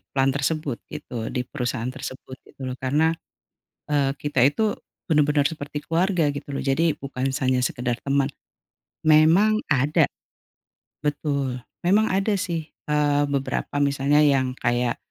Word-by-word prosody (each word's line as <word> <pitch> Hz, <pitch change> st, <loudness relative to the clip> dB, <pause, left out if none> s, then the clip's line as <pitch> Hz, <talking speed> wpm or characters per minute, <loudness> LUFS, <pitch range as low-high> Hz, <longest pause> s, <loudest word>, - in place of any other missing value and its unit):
plant 135 Hz, 0 st, +3 dB
tersebut 145 Hz, -2 st, -1 dB
gitu, 115 Hz, -2 st, -6 dB
di 125 Hz, -, -2 dB
perusahaan 125 Hz, 0 st, -3 dB
tersebut 130 Hz, -1 st, -8 dB
gitu 135 Hz, -, -12 dB
loh 125 Hz, -, -3 dB
karena, 150 Hz, +5 st, +2 dB, 0.8 s
eee, 140 Hz, -2 st, +2 dB
kita 145 Hz, -4 st, 0 dB
itu 210 Hz, +8 st, +1 dB, 0.3 s
benar-benar 150 Hz, -3 st, +3 dB
seperti 145 Hz, -1 st, -4 dB
keluarga 170 Hz, -2 st, +1 dB
gitu 140 Hz, 0 st, -6 dB
loh -, -, -2 dB
jadi 155 Hz, +3 st, +2 dB
bukan 135 Hz, -1 st, -3 dB
hanya 130 Hz, -1 st, +2 dB
sekedar 125 Hz, -1 st, -1 dB
teman. 140 Hz, 0 st, +1 dB, 0.7 s
Memang 165 Hz, +8 st, +5 dB
ada 145 Hz, 0 st, +3 dB, 0.9 s
betul. 140 Hz, -3 st, -1 dB, 0.3 s
Memang 210 Hz, +5 st, +4 dB
ada 195 Hz, +3 st, +1 dB
sih, 165 Hz, -4 st, -3 dB, 0.2 s
eee, 145 Hz, -1 st, +2 dB
beberapa 140 Hz, +1 st, -2 dB
misalnya 140 Hz, +1 st, +3 dB
yang 135 Hz, -3 st, +3 dB
kayak, 120 Hz, 0 st, 0 dB
145 Hz, 130 wpm, -24 LUFS, 130-155 Hz, 0.9 s, Memang